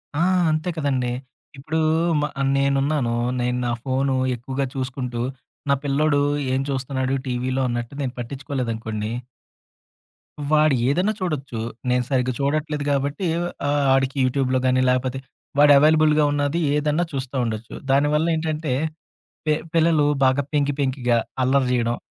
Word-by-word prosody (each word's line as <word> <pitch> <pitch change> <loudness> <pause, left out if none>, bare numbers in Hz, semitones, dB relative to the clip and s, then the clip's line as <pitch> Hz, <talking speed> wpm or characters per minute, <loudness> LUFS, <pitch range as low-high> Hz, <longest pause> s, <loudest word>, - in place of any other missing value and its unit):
ఆ! 160 - 0 0.3
అంతే 155 +3 -1
కదండీ! 130 -5 0 0.5
ఇప్పుడు 155 +4 -2 0.4
మ - - 0 0.3
నేనున్నాను. 140 -2 +1 0.3
నేను 125 0 0
నా 120 - 0
ఫోన్ 135 0 0 0.2
ఎక్కువగా 130 +3 -3
చూసుకుంటూ 125 -2 -3 0.5
నా 140 - +5
పిల్లోడు 145 +1 +2 0.3
ఏం 135 - +1
చూస్తున్నాడు 130 0 -1
టీవీలో 130 +1 -1
అన్నట్టు 120 +2 -3
నేను 130 -3 -2
పట్టించుకోలేదనుకోండి... 115 -4 -4 1.4
వాడు 155 -2 +4
ఏదన 180 +8 +2
చూడొచ్చు. 140 - -3 0.3
నేను 125 0 +2
సరిగ్గా 130 -2 +1
చూడట్లేదు 150 +1 -1
గాబట్టి 140 +5 0 0.4
ఆహ్, 145 0 +2
ఆడికి 135 +1 +1
యూట్యూబ్‌లో 130 0 +1
గాని 130 0 +3
లేపోతే, 130 +1 0 0.4
వాడు 145 0 +7
అవైలబుల్‌గా 155 0 +4
ఉన్నది 145 +3 0 0.2
ఏదన్నా 150 +3 +1
చూస్తా 135 -1 -4
ఉండొచ్చు. 110 0 -5 0.2
దానివల్ల 145 +3 +3
ఏంటంటే 155 -3 -2 0.7
పె 155 - +4 0.2
పిల్లలు 160 -2 +3 0.2
బాగా 130 +2 +3
పెంకి, 145 -1 +2
పెంకిగా 130 -3 +1 0.3
అల్లరి 130 0 +2
జేయడం 120 -1 0
135 Hz, 125 wpm, -22 LUFS, 125-150 Hz, 1.4 s, వాడు